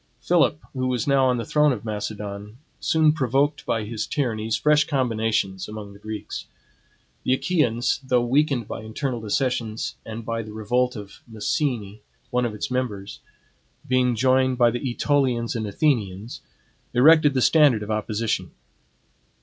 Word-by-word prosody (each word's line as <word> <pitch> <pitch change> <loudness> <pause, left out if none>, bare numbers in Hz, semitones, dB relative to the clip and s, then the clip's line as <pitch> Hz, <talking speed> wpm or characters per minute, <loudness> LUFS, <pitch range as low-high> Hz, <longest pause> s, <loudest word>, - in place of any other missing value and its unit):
Philip, 165 +2 +2
who 130 -1 -1
was 125 -3 -1
now 135 -2 +3
on 125 -1 +2
the 115 - -3
throne 150 +3 +3
of 115 -3 -4
Macedon, 105 0 -5 0.2
soon 160 -1 +3
provoked 140 +1 0
by 115 -1 0
his 110 +1 -4
tyrannies, 110 -7 -1
fresh 150 -1 +4
combinations 110 - 0
among 105 -2 -8
the 100 - -15
Greeks. 110 0 -6 0.8
The 130 - +2
Achaeans, 130 -8 +1
though 125 -2 +2
weakened 135 -3 +1
by - - -6
internal 115 +3 -4
dissensions 120 +2 -2
and 110 0 -7
by 115 0 -2
the 110 -1 -9
revolt 125 +4 0
of 100 -2 -10
Messene, 110 -2 -2 0.3
one 125 -1 +1
of 110 -3 -3
its 105 - -4
members, 105 -6 -3 0.7
being 125 -1 +2
joined 130 +1 +2
by 120 -1 +4
the 120 - -3
AEtolians 125 -2 0
and 110 -2 -2
Athenians, 105 -4 -1 0.5
erected 150 +2 +6
the 130 - +2
standard 145 -9 +5
of 105 - -5
opposition. 110 +1 -1
120 Hz, 150 wpm, -24 LUFS, 110-135 Hz, 0.8 s, erected